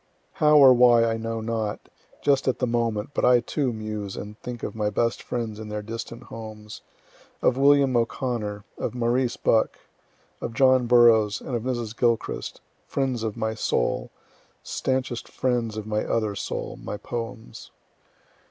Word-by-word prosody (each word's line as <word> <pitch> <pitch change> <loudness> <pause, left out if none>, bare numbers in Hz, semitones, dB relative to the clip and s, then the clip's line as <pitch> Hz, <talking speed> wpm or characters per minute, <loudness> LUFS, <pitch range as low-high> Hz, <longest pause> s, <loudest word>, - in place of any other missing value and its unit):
"] - - -41
How 150 0 +6
or 135 -3 +9
why 120 -1 +6
I 115 0 0
know 115 0 -3
not, 110 -2 -2 0.4
just 140 -2 +2
at 130 - +2
the 125 - 0
moment, 115 -1 -1
but - - -1
I 125 0 +6
too 130 +2 -1
muse 110 -3 -5
and 105 +1 -7
think 120 -1 -7
of - - -3
my 105 -1 -1
best 115 +3 0
friends 115 -3 -4
in 110 -1 -7
their 105 0 -4
distant 115 +2 -7
homes 110 -2 -9 0.6
of - - +4
William 140 -1 +4
O'Connor, 115 -3 -2
of - - -3
Maurice 120 +1 0
Bucke, 110 - +2 0.6
of 115 - -5
John 130 -1 +4
Burroughs, 115 -3 +5
and 125 - -5
of 115 - -1
Mrs. 120 -2 -3
Gilchrist 120 -2 -1 0.3
friends 130 -4 -1
of 110 -2 -3
my 110 0 -1
soul 110 - -1 0.5
stanchest 130 -2 -2
friends 120 -4 -1
of 110 - -5
my 105 0 -1
other 110 -3 0
soul, 100 - -5
my 105 - -5
poems. 115 +1 -7
115 Hz, 160 wpm, -25 LUFS, 110-125 Hz, 0.6 s, or